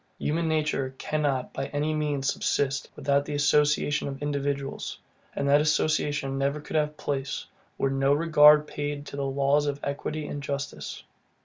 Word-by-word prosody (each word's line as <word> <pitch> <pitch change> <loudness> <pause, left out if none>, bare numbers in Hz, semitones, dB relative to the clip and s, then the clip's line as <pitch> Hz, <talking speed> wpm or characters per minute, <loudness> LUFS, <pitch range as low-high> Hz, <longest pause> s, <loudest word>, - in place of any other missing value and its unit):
Human 165 +2 -1
nature 150 -4 0
cannot 145 -4 -1
by 135 - -3
any 150 +2 -1
means 145 -3 0
subsist, 140 0 -1
without 140 0 +1
the 145 0 -4
association 145 0 +2
of 135 -1 -5
individuals; 140 -1 -3 0.4
and 140 - -1
that 145 +1 +5
association 150 -3 +1
never 140 +2 0
could 150 - -8
have 150 -1 +1
place, 140 -2 -3 0.3
were 135 - +1
no 135 0 +2
regard 150 -1 +6
paid 145 -1 -4
to 140 - -8
the 140 - -2
laws 140 +2 +2
of 140 0 -2
equity 145 +2 -3
and 145 -1 -5
justice. 140 0 -5
145 Hz, 155 wpm, -27 LUFS, 140-150 Hz, 0.4 s, regard